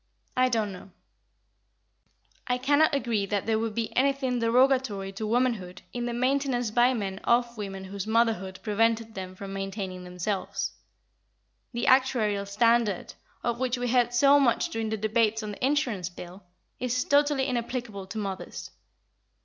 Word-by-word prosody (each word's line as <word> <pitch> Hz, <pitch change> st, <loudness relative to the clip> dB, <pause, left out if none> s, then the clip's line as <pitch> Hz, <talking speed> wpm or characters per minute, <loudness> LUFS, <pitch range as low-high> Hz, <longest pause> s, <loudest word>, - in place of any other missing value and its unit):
I 255 Hz, 0 st, +3 dB
don't 220 Hz, -4 st, 0 dB
know. 185 Hz, +1 st, -11 dB, 1.6 s
I 250 Hz, -1 st, +1 dB
cannot 285 Hz, +4 st, +3 dB
agree 230 Hz, -7 st, 0 dB
that 200 Hz, -1 st, -1 dB
there 220 Hz, -1 st, +1 dB
would 225 Hz, -1 st, -2 dB
be 230 Hz, -1 st, -3 dB
anything 265 Hz, -2 st, +1 dB
derogatory 235 Hz, -4 st, +2 dB
to 215 Hz, +3 st, -4 dB
womanhood 220 Hz, -6 st, 0 dB
in 240 Hz, 0 st, -2 dB
the 240 Hz, -, -2 dB
maintenance 255 Hz, -2 st, 0 dB
by 245 Hz, +3 st, +4 dB
men 195 Hz, -3 st, -3 dB
of 240 Hz, +1 st, +1 dB
women 195 Hz, -3 st, -6 dB
whose 195 Hz, +1 st, -6 dB
motherhood 220 Hz, -5 st, +1 dB
prevented 225 Hz, +1 st, +1 dB
them 185 Hz, -2 st, -7 dB
from 195 Hz, -1 st, -7 dB
maintaining 195 Hz, -2 st, -4 dB
themselves. 180 Hz, +2 st, -3 dB, 1.0 s
The 235 Hz, -1 st, -2 dB
actuarial 220 Hz, -6 st, +3 dB
standard, 225 Hz, -1 st, +2 dB, 0.3 s
of 235 Hz, 0 st, -1 dB
which 255 Hz, -1 st, 0 dB
we 245 Hz, 0 st, -2 dB
heard 245 Hz, 0 st, +3 dB
so 275 Hz, +4 st, +5 dB
much 250 Hz, -4 st, +2 dB
during 225 Hz, -1 st, -3 dB
the 220 Hz, -, -1 dB
debates 220 Hz, +1 st, +1 dB
on 210 Hz, -, -4 dB
the 205 Hz, -, -8 dB
Insurance 255 Hz, -, 0 dB
Bill, 180 Hz, +2 st, -10 dB, 0.4 s
is 250 Hz, 0 st, 0 dB
totally 285 Hz, -1 st, +3 dB
inapplicable 235 Hz, -5 st, -3 dB
to 220 Hz, -, -7 dB
mothers. 195 Hz, -3 st, -5 dB
230 Hz, 150 wpm, -27 LUFS, 200-250 Hz, 1.6 s, so